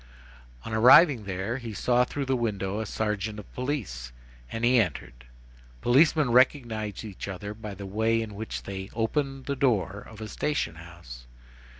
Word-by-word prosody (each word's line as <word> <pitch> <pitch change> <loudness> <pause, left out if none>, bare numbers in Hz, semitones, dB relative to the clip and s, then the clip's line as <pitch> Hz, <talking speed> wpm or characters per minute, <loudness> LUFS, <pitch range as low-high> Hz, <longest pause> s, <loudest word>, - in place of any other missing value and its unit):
On 115 - -5
arriving 125 - +7
there, 95 +5 -3
he 115 -4 -7
saw 125 +3 +3
through 140 +2 -4
the 135 0 +1
window 105 -4 -2
a 110 - -3
sergeant 105 0 -2
of 105 - -11
police, 105 - -4 0.4
and 115 +1 -1
he 125 0 +5
entered. 65 - -5 0.5
Policemen 140 - +4
recognize 115 -5 +2
each 100 -3 -7
other 100 +1 -5
by 105 -2 -8
the 100 +1 -8
very 95 +1 -10
way 115 +1 +2
in 105 -2 -8
which 110 +2 -5
they 95 0 -6
open 135 +4 -1
the 140 +1 -2
door 100 -8 +1
of 110 -1 -12
a 110 - -6
station 145 - -2
house. 80 -8 -12
110 Hz, 170 wpm, -27 LUFS, 95-125 Hz, 0.5 s, arriving